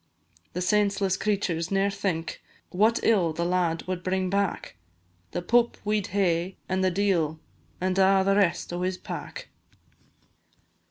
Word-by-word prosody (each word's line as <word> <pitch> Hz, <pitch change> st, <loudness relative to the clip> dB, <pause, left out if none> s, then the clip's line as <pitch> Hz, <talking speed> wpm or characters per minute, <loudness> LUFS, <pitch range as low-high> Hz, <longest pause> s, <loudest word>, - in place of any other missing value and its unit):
The 180 Hz, -, -2 dB
senseless 200 Hz, -1 st, +2 dB
creturs 185 Hz, -5 st, -1 dB
ne'er 195 Hz, +1 st, +1 dB
think 185 Hz, -5 st, -3 dB, 0.3 s
What 215 Hz, +5 st, +3 dB
ill 185 Hz, -8 st, +3 dB
the 170 Hz, +2 st, -2 dB
lad 175 Hz, -2 st, 0 dB
wad 185 Hz, -1 st, -3 dB
bring 185 Hz, 0 st, -1 dB
back; 200 Hz, -2 st, -1 dB, 0.5 s
The 175 Hz, -, -4 dB
Pope 235 Hz, +5 st, +2 dB
we 210 Hz, 0 st, +1 dB
'd -, -, -7 dB
hae, 185 Hz, -2 st, 0 dB
and 190 Hz, 0 st, 0 dB
the 185 Hz, -, +4 dB
d 200 Hz, +3 st, +1 dB
l, 160 Hz, -3 st, 0 dB, 0.4 s
And 185 Hz, +1 st, 0 dB
a' 190 Hz, 0 st, +5 dB
the 195 Hz, 0 st, +3 dB
rest 175 Hz, -4 st, +1 dB
o' 175 Hz, -, -3 dB
his 185 Hz, 0 st, -1 dB
pack. -, -, -7 dB
185 Hz, 155 wpm, -26 LUFS, 175-200 Hz, 0.5 s, a